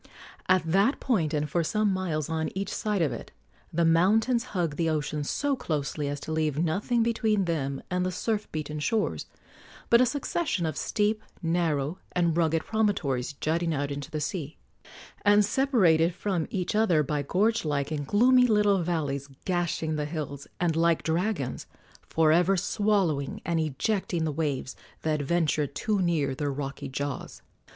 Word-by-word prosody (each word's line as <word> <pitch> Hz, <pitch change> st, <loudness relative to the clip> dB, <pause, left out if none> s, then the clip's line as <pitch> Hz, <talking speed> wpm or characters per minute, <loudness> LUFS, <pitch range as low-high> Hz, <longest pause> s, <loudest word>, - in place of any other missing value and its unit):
At 185 Hz, -1 st, +4 dB
that 200 Hz, -, +3 dB
point, 185 Hz, -, +1 dB
and 150 Hz, -1 st, 0 dB
for 170 Hz, +3 st, 0 dB
some 210 Hz, +4 st, +1 dB
miles 165 Hz, -6 st, -2 dB
on 160 Hz, -1 st, -1 dB
each 195 Hz, +1 st, -3 dB
side 210 Hz, -5 st, 0 dB
of 150 Hz, -, 0 dB
it, -, -, -8 dB, 0.4 s
the 170 Hz, +1 st, +1 dB
mountains 220 Hz, +9 st, +3 dB
hug 175 Hz, -10 st, -2 dB
the 165 Hz, 0 st, 0 dB
ocean 150 Hz, -1 st, -1 dB
so 285 Hz, -, 0 dB
closely 150 Hz, -, -2 dB
as 145 Hz, 0 st, -3 dB
to -, -, -6 dB
leave 155 Hz, -2 st, 0 dB
nothing 195 Hz, +9 st, +1 dB
between 220 Hz, -3 st, +1 dB
them 140 Hz, -5 st, -2 dB
and 180 Hz, 0 st, +1 dB
the 185 Hz, -, -1 dB
surf 210 Hz, +3 st, -2 dB
beaten 150 Hz, -1 st, -4 dB
shores 215 Hz, +7 st, -1 dB, 0.6 s
but 235 Hz, +1 st, +7 dB
a 255 Hz, -, +4 dB
succession 285 Hz, -, -1 dB
of 155 Hz, -3 st, -2 dB
steep, 215 Hz, 0 st, 0 dB, 0.2 s
narrow 165 Hz, -1 st, 0 dB
and 170 Hz, -2 st, +2 dB
rugged 165 Hz, -1 st, +1 dB
promontories 160 Hz, -, 0 dB
jutting 165 Hz, +3 st, -1 dB
out 145 Hz, 0 st, -2 dB
into 140 Hz, +1 st, -5 dB
the 155 Hz, -, -3 dB
sea, 150 Hz, 0 st, -4 dB, 0.6 s
and 205 Hz, 0 st, +5 dB
separated 190 Hz, -, +3 dB
from 185 Hz, -5 st, -1 dB
each 185 Hz, -3 st, -2 dB
other 190 Hz, -8 st, +3 dB
by 150 Hz, +1 st, -1 dB
gorge 210 Hz, +10 st, +1 dB
like 145 Hz, -2 st, -1 dB
and 145 Hz, -2 st, -3 dB
gloomy 250 Hz, +4 st, +5 dB
little 205 Hz, -4 st, +3 dB
valleys 145 Hz, -5 st, -2 dB, 0.2 s
gashing 170 Hz, -4 st, -1 dB
the 150 Hz, -, -1 dB
hills 145 Hz, -3 st, -5 dB
and, 170 Hz, -3 st, +1 dB
like 165 Hz, 0 st, +2 dB
dragons, 165 Hz, -, -1 dB, 0.4 s
for 160 Hz, -1 st, +3 dB
ever 180 Hz, +4 st, +4 dB
swallowing 190 Hz, -7 st, 0 dB
and 170 Hz, -1 st, 0 dB
ejecting 165 Hz, +3 st, -1 dB
the 160 Hz, -, 0 dB
waves 145 Hz, -3 st, -2 dB, 0.3 s
that 155 Hz, -2 st, 0 dB
venture 155 Hz, -1 st, +1 dB
too 195 Hz, +10 st, -1 dB
near 160 Hz, -6 st, +1 dB
their 145 Hz, +1 st, -2 dB
rocky 135 Hz, 0 st, -5 dB
jaws. 140 Hz, +1 st, -5 dB
165 Hz, 165 wpm, -27 LUFS, 150-205 Hz, 0.6 s, but